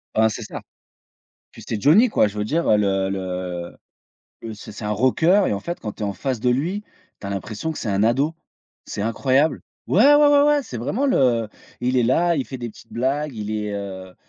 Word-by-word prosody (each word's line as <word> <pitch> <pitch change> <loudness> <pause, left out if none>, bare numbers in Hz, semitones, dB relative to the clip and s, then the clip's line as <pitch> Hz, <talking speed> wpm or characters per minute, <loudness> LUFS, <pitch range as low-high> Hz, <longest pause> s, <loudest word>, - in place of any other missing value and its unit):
Ben, 110 0 +4
c'est 105 - -6
ça, - - -7 0.9
puis - - -13
c'est 105 -3 -3
Johnny 215 - +5
quoi! 110 - +3
Je 105 +1 -8
veux 105 - 0
dire, 165 +7 0
heu 105 - +5
le 95 -2 +1
le 90 -2 -4 0.7
le 110 -1 -7
c'est 105 +1 -11
c'est 105 - -8
un 105 - -2
rockeur 160 - +3
et - - 0
en 100 - -2
fait 170 - -5
quand 105 -2 -5
tu - - -10
es 105 - 0
en 100 - -3
face 125 +4 -3
de 125 - +1
lui, 170 +11 -1 0.4
tu 100 - -7
as - - -4
l'impression 105 - -4
que - - -8
c'est 110 - -3
un 100 +1 +1
ado. 135 +8 +2 0.5
C'est 100 - -4
incroyable. 130 +7 +1 0.3
Ouais, 270 +9 +6
ouais, 295 0 +6
ouais, 285 0 +5
ouais, 295 -1 +3
c'est 120 - -7
vraiment 215 - -1
le 120 - +2 0.3
il 125 +1 +1
est - - +3
là, 165 +8 +2
il 135 - -2
fait 130 - -6
des 120 -2 -5
petites 115 - -17
blagues, 135 +3 -1
il 105 -1 -5
est, 105 -1 -3
heu 95 -2 -7
115 Hz, 230 wpm, -22 LUFS, 105-155 Hz, 0.9 s, Ouais